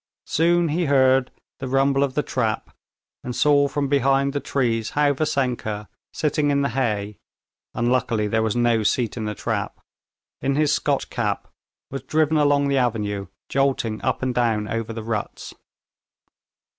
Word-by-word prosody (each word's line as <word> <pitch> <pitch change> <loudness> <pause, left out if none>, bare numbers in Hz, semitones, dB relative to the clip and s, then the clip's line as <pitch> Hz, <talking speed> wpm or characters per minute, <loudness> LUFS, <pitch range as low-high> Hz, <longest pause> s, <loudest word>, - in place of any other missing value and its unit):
Soon 170 +1 +2
he 170 +4 0
heard 130 -2 +4 0.3
the 135 - -4
rumble 135 +1 +2
of 135 -2 -2
the 150 - +1
trap, 115 -4 -2 0.5
and 125 -1 -5
saw 145 -1 +4
from 140 0 -1
behind 135 0 +2
the 145 - 0
trees 115 -6 -1
how 145 -1 +4
Vassenka, 125 -7 -2 0.2
sitting 150 -1 0
in 140 0 +2
the 140 - +1
hay 105 -5 -2 0.6
(unluckily 120 -2 +1
there 110 +2 +1
was 110 0 0
no 120 -2 +2
seat 115 +2 0
in 110 -3 -4
the 105 0 -3
trap) - - -3 0.6
in 135 +1 0
his 150 0 +2
Scotch 145 -2 0
cap, 105 -5 -2 0.4
was 135 - -4
driven 155 0 +1
along 145 -1 +3
the 140 -1 +2
avenue, 105 -5 -1 0.2
jolting 135 -5 0
up - - -1
and 130 -1 0
down 115 -3 +1
over 115 0 -3
the 115 -1 -6
ruts. 110 -2 -4
130 Hz, 155 wpm, -23 LUFS, 115-140 Hz, 0.6 s, heard